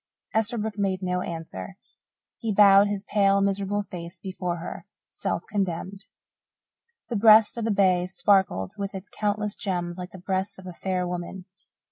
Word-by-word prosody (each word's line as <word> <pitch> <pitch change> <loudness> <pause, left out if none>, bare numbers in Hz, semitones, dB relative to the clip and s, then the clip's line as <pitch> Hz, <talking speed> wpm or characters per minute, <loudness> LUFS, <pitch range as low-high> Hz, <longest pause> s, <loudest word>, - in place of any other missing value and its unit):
Esterbrook 220 -1 -1
made 190 -1 0
no 180 0 0
answer. 165 - -6 0.6
He 225 - -2
bowed 200 0 +7
his 205 -1 -3
pale, 200 -2 +3
miserable 200 +1 0
face 175 -2 -8
before 180 -1 -4
her, 165 - -7 0.2
self - - -3
condemned. 195 +1 -3 1.0
The 240 - -2
breast 215 0 +7
of 230 -2 -3
the - - 0
bay 185 -3 +3
sparkled 190 - +2
with 200 0 -4
its 190 +1 -8
countless 210 0 -1
gems 175 -3 -3
like 180 0 -6
the 190 - -11
breast 190 +1 -2
of 190 - -12
a 180 - -7
fair 180 0 -2
woman. 180 +1 -5
195 Hz, 155 wpm, -26 LUFS, 180-205 Hz, 1.0 s, bowed